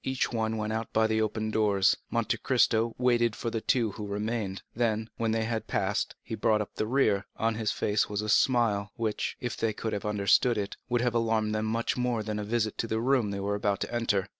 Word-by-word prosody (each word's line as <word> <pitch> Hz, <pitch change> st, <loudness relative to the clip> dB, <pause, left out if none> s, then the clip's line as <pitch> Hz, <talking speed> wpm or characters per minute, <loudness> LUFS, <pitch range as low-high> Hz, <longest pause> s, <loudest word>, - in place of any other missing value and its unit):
Each 130 Hz, -1 st, -1 dB
one 110 Hz, -1 st, -1 dB
went 110 Hz, 0 st, -2 dB
out 110 Hz, 0 st, -3 dB
by 110 Hz, 0 st, +4 dB
the 110 Hz, 0 st, +1 dB
open 110 Hz, 0 st, -1 dB
doors. 100 Hz, -3 st, +3 dB
Monte -, -, 0 dB
Cristo 115 Hz, +1 st, +2 dB
waited 120 Hz, -3 st, +2 dB
for 115 Hz, -, -3 dB
the 115 Hz, -, -2 dB
two 115 Hz, -3 st, +1 dB
who 105 Hz, +1 st, -6 dB
remained; 105 Hz, -1 st, -3 dB
then, 110 Hz, -1 st, 0 dB
when 115 Hz, -1 st, 0 dB
they 110 Hz, 0 st, +1 dB
had 110 Hz, 0 st, -2 dB
passed, -, -, -1 dB
he 115 Hz, -, -7 dB
brought 110 Hz, 0 st, +2 dB
up 105 Hz, -, -4 dB
the 110 Hz, -, -2 dB
rear, 110 Hz, -6 st, +2 dB
and 115 Hz, -, +1 dB
on -, -, -2 dB
his 110 Hz, -1 st, -1 dB
face 105 Hz, 0 st, 0 dB
was 105 Hz, 0 st, -2 dB
a -, -, -4 dB
smile, 110 Hz, -3 st, +3 dB
which, 110 Hz, -2 st, -2 dB
if 125 Hz, -2 st, -3 dB
they 115 Hz, -1 st, -1 dB
could 110 Hz, +1 st, -4 dB
have 100 Hz, -, -3 dB
understood 105 Hz, +3 st, +3 dB
it, 100 Hz, -1 st, -3 dB
would 120 Hz, -1 st, +1 dB
have 125 Hz, -1 st, +1 dB
alarmed 110 Hz, -2 st, +1 dB
them 110 Hz, 0 st, -1 dB
much 115 Hz, +3 st, -1 dB
more 125 Hz, -3 st, 0 dB
than 105 Hz, 0 st, -3 dB
a -, -, -3 dB
visit 110 Hz, 0 st, -1 dB
to 115 Hz, -, -1 dB
the 110 Hz, 0 st, -1 dB
room 125 Hz, -2 st, +2 dB
they 100 Hz, 0 st, -3 dB
were 100 Hz, +1 st, -1 dB
about 100 Hz, -1 st, 0 dB
to -, -, -3 dB
enter. 105 Hz, -5 st, +1 dB
110 Hz, 240 wpm, -28 LUFS, 105-115 Hz, -, by